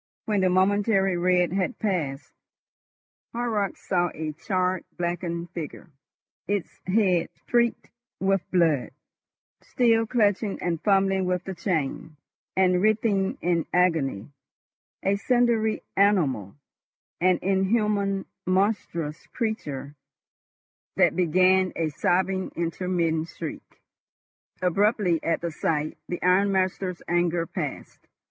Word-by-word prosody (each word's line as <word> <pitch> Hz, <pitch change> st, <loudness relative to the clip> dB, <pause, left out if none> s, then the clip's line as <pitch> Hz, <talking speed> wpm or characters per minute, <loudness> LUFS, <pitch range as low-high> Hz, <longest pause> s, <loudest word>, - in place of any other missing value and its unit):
When 210 Hz, -3 st, +1 dB
the 185 Hz, -, +3 dB
momentary 195 Hz, +1 st, +2 dB
red 180 Hz, 0 st, +2 dB
had 195 Hz, +5 st, -1 dB
passed, 155 Hz, -10 st, -2 dB, 1.0 s
Horrocks 225 Hz, -4 st, -2 dB
saw 175 Hz, -1 st, +2 dB
a 155 Hz, 0 st, -3 dB
charred, 180 Hz, +3 st, -1 dB
blackened 175 Hz, 0 st, -3 dB
figure, 165 Hz, +1 st, -7 dB, 0.6 s
its 200 Hz, -3 st, -3 dB
head 185 Hz, -3 st, +2 dB
streaked 235 Hz, -1 st, 0 dB, 0.3 s
with 195 Hz, 0 st, +2 dB
blood, 165 Hz, -8 st, +2 dB, 0.7 s
still 225 Hz, -2 st, +2 dB
clutching 210 Hz, -3 st, +1 dB
and 170 Hz, -3 st, -2 dB
fumbling 195 Hz, -2 st, +2 dB
with 180 Hz, -1 st, -1 dB
the 190 Hz, -, -5 dB
chain, 160 Hz, -3 st, -3 dB, 0.4 s
and 180 Hz, -1 st, +3 dB
writhing 210 Hz, -2 st, +1 dB
in 170 Hz, -2 st, 0 dB
agony—a 150 Hz, -, -2 dB
cindery 235 Hz, -1 st, +1 dB
animal, 150 Hz, -, +2 dB, 0.6 s
an 185 Hz, 0 st, +3 dB
inhuman, 195 Hz, 0 st, +1 dB, 0.2 s
monstrous 185 Hz, -5 st, -1 dB
creature 145 Hz, -, -4 dB, 1.0 s
that -, -, +3 dB
began 185 Hz, +2 st, +3 dB
a 165 Hz, -2 st, 0 dB
sobbing 185 Hz, +4 st, 0 dB
intermittent 165 Hz, -1 st, -1 dB
shriek. -, -, -9 dB, 0.8 s
Abruptly, 185 Hz, -2 st, +2 dB
at 165 Hz, -, 0 dB
the 170 Hz, -1 st, -3 dB
sight, 155 Hz, -1 st, -2 dB
the 175 Hz, -, -3 dB
ironmaster's 185 Hz, -1 st, +1 dB
anger 175 Hz, -1 st, +1 dB
passed. -, -, -6 dB
185 Hz, 100 wpm, -25 LUFS, 170-200 Hz, 1.0 s, the